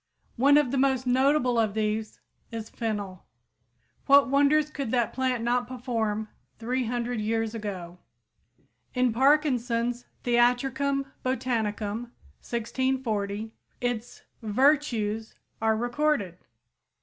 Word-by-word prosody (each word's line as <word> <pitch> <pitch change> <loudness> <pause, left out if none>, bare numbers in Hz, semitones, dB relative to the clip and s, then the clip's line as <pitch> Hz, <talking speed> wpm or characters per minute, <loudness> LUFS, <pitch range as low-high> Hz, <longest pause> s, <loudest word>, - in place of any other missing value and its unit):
One 280 +4 +6
of 290 -5 +2
the 270 - +1
most 265 -1 +2
notable 255 -1 +3
of 215 -2 +1
these 215 0 -2 0.3
is 225 -1 -6
fennel. 205 -5 -4 0.8
What 280 -1 +6
wonders 290 +2 +3
could 275 -5 -4
that 240 -1 +1
plant 255 -3 0
not 245 +1 +1
perform 230 -4 -2 0.3
300 240 0 -2
years 225 +1 -1
ago! 185 -5 -6 1.0
In 250 -2 +2
Parkinson's 245 -3 +2 0.2
"Theatricum 265 +3 +2 0.2
Botanicum" 230 -4 -1 0.4
(1640) 225 -3 -2 0.3
its 245 -2 -3 0.2
"vertues" 225 -2 +1 0.3
are 220 0 +2
recorded. 240 - 0
240 Hz, 100 wpm, -27 LUFS, 220-260 Hz, 1.0 s, One